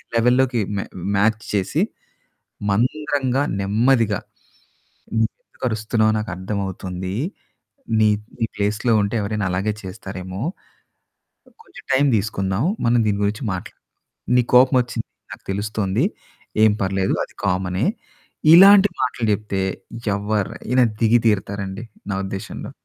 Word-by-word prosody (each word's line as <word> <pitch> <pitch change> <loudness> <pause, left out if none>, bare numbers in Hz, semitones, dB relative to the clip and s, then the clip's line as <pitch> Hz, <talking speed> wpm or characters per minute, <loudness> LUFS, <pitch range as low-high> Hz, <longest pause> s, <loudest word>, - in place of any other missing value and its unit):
లెవెల్‌లోకి 125 +1 +3 0.2
మ్యా 100 - -2 0.3
మ్యాచ్ 110 +2 +2
చేసి, 95 -2 0 0.9
మంద్రంగా, 135 +4 +1 0.2
నెమ్మదిగా, 110 +1 +2 1.0
"నువ్వు 110 0 +3 0.2
ఎందుకు - - -8
అరుస్తున్నావో 110 0 +1
నాకు 105 -1 -4
అర్థమవుతుంది. 95 -1 -4 0.9
నీ 110 - +5 0.5
ప్లేస్‌లో 105 +3 0
ఉంటే 100 +2 -2
ఎవరైనా 100 -1 -2
అలాగే 95 +4 0
చేస్తారేమో. 95 0 -7 1.2
కొంచెం 385 -2 -14
టైమ్ 140 +1 +4
తీసుకుందాం. 95 +1 -1 0.2
మనం 120 0 +4
దీని 100 -1 0
గురించి 105 +6 -1
మాట్లాడుదాం. 90 - -8 0.5
నీకు 125 -1 +2
కోపం 130 +1 +6
వచ్చింది 120 - -5 0.3
నాకు - - -11
తెలుస్తుంది. 105 - -1 0.6
ఏం 110 - +5
పర్లేదు. 95 0 0
అది - - -19
కామనే." 90 +3 0 0.7
ఇలాంటి 200 +2 +9
మాటలు 125 -2 -1
చెప్తే 100 -2 -2 0.5
ఎవరైనా 105 +4 0 0.2
దిగి 115 +1 +5
తీరుతారండి. 100 0 -1 0.3
నా - - 0
ఉద్దేశంలో. 95 0 -6
105 Hz, 110 wpm, -21 LUFS, 95-120 Hz, 1.2 s, ఇలాంటి